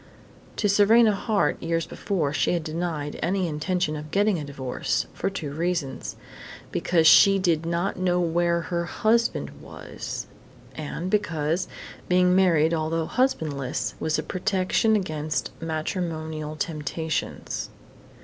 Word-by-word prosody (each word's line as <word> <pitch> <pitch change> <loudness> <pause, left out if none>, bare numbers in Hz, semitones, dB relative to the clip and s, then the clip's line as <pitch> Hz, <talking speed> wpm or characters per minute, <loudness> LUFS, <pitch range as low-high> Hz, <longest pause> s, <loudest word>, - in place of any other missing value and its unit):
To 210 - +1
Serena 215 +3 +5
Hart, 200 -6 0
years 165 0 0
before, 160 -8 -2
she - - +1
had 170 -2 -1
denied 155 -2 -3
any 190 0 0
intention 155 +1 -1
of 150 0 -7
getting 200 +1 +2
a - - -4
divorce, 135 -3 -2
for - - -1
two 160 -8 -5
reasons 165 -3 -2 0.6
because 165 -3 +2
she 195 +4 +8
did 170 -4 +1
not 170 +4 -1
know 180 -1 +2
where 170 0 +1
her 170 0 -2
husband 230 +6 +1
was, - - -7 0.5
and 160 +4 -5
because, 165 -3 0 0.4
being 180 0 +4
married 170 -4 +4
although 160 0 0
husbandless, 155 - -1
was 155 - 0
a - - -2
protection 195 +3 +1
against 155 -6 -2
matrimonial 160 -1 -3
temptations. 155 0 -3
170 Hz, 125 wpm, -25 LUFS, 155-185 Hz, 0.6 s, she